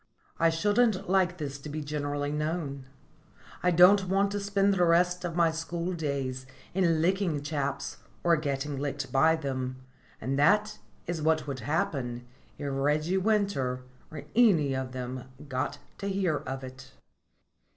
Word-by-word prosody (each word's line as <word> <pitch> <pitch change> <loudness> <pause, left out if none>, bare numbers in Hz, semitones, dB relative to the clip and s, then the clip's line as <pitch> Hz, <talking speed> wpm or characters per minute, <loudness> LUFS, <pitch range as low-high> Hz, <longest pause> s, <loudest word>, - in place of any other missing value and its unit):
I 165 - +5
shouldn't 205 +5 +2
like 185 -2 +3
this 145 -3 -5
to 150 - -8
be 150 +1 -4
generally 145 -1 -2
known. 150 -3 -3 0.7
I 180 - +3
don't 185 +3 +6
want 195 +1 +2
to 205 - -1
spend 200 0 +2
the 180 -2 +2
rest 175 +1 +3
of 170 -2 -3
my 170 -2 +4
school 170 +2 -3
days 135 -5 -3 0.3
in 170 -4 +2
licking 180 -5 +1
chaps 140 -2 -3 0.3
or 170 -1 +5
getting 140 -2 -2
licked 140 -1 -3
by 160 +4 +4
them, 130 -4 -3 0.4
and 135 +2 -2
that 210 +8 +3 0.3
is 170 -2 -3
what 160 0 +2
would 140 -3 -4
happen 120 -2 -2 0.3
if 145 - -4
Reggie 150 +6 +1
Winter 190 -12 0 0.3
or 150 -3 -8
any 180 - +5
of 130 -1 -3
them 125 0 -5 0.2
got 130 +2 -2 0.2
to 200 - -3
hear 190 -6 +1
of 135 0 -6
it. 130 0 -10
155 Hz, 150 wpm, -29 LUFS, 135-180 Hz, 0.7 s, don't